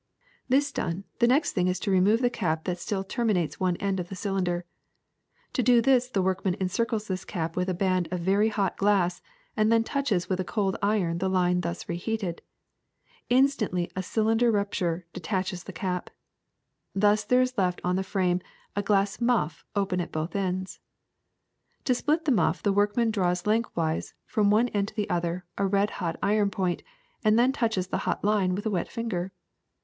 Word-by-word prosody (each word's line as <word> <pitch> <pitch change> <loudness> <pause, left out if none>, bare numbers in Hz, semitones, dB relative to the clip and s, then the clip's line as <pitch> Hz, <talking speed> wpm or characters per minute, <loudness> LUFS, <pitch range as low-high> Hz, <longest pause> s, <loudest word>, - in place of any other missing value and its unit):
^^This 280 +2 +2
done, 180 -3 -2 0.2
the 235 - +5
next 275 +5 +3
thing 180 -2 +1
is 185 0 0
to 200 - -1
remove 200 +6 +4
the 245 - +4
cap 160 -8 -1
that 180 -1 -3
still 195 +2 -2
terminates 200 -5 -1
one 185 -2 +1
end 195 -1 -1
of 175 -1 -5
the 195 - -6
cylinder. 180 -3 -1 0.9
To 255 - +1
do 245 0 +5
this 250 +1 +3
the 200 -7 0
workman 190 0 0
encircles 215 +3 -1
this 185 -1 -3
cap 165 -3 -4
with 180 +1 0
a 185 - 0
band 185 -1 +1
of 180 -1 -3
very 200 +5 +3
hot 200 -4 -1
glass, 195 -3 +2 0.3
and 215 -1 +3
then 230 0 +4
touches 225 -9 -1
with 185 -1 -1
a - - +1
cold 195 0 -1
iron 195 -5 +1
the 190 +1 0
line 180 -1 +2
thus 170 +1 -4
reheated. 175 0 -3 0.9
Instantly 245 -9 +2
a 190 - -1
circular 225 +4 +2
rupture 185 -5 -1
detaches 185 0 -3
the - - -7
cap. 180 +1 -3 0.9
Thus 210 +2 +3
there 250 +4 +3
is 255 0 -3
left 180 -4 +1
on 180 +1 +1
the 190 - +1
frame 185 -2 0 0.3
a 205 - +1
glass 200 +1 +1
muff 210 -11 +1
open 190 -3 0
at 170 - -6
both 155 +4 -3
ends. 185 -1 -2 1.0
To 255 - +2
split 305 +6 0
this 285 - +3
muff 225 - +1
the 200 - +2
workman 205 +3 +2
draws 180 -3 0
lengthwise, 210 -7 0
from 210 -2 +2
one 225 +4 +3
end 200 -2 0
to 215 - -10
the 210 -3 -2
other, 175 +1 -1
a 200 - +2
red 200 +1 +2
hot 170 -2 -2
iron 205 0 +3
point, 185 -3 -1 0.4
and 215 0 +4
then 245 +2 +4
touches 225 -8 -1
the - - -1
hot - - -2
line 200 -3 +2
with 205 - -5
a 220 - 0
wet 180 -4 -1
finger. 195 -6 -3
195 Hz, 190 wpm, -27 LUFS, 180-220 Hz, 1.0 s, the